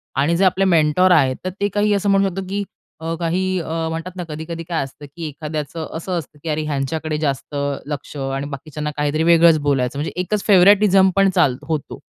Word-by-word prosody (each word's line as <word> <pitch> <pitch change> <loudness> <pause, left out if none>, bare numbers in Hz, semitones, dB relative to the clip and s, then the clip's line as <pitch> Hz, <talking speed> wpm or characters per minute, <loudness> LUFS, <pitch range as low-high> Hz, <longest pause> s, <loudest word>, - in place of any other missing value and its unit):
आणि 145 +5 +2
जे 195 - +3
आपले 190 +1 +2
मेंटॉर 170 +1 +3
आहेत, 135 -6 +4
तर - - 0
ते 205 - +3
काही 205 0 +2
असं 200 0 0
म्हणू 195 0 +4
शकतो, 195 +2 -5
की 200 +1 -2 0.4
अ, 165 +1 -3
काही 185 +2 0
अ, 160 0 -3
म्हणतात 165 +3 -5
ना 180 - -4
कधी-कधी 160 +2 -6
काय 165 -4 0
असतं, 135 +2 -10
की 165 -2 -5
एखाद्याचं 155 +1 -5
असं 175 +2 -3
असतं, 150 -1 -12
की 165 - -4
अरे, 155 0 0
ह्यांच्याकडे 150 +2 -2
जास्त 145 -1 -3 0.3
लक्ष, 145 0 -6
आणि 135 +1 -3
बाकीच्यांना 150 +2 -5
काहीतरी 150 +2 0
वेगळंच 170 -1 +6
बोलायचं, 140 -2 0
म्हणजे 150 - -3
एकच 205 +3 -2
फेव्हरेटिझम 195 0 +6
पण 195 0 +4
चालतो 145 -5 +2
होतो. 155 -4 -3
160 Hz, 200 wpm, -20 LUFS, 150-185 Hz, 0.4 s, वेगळंच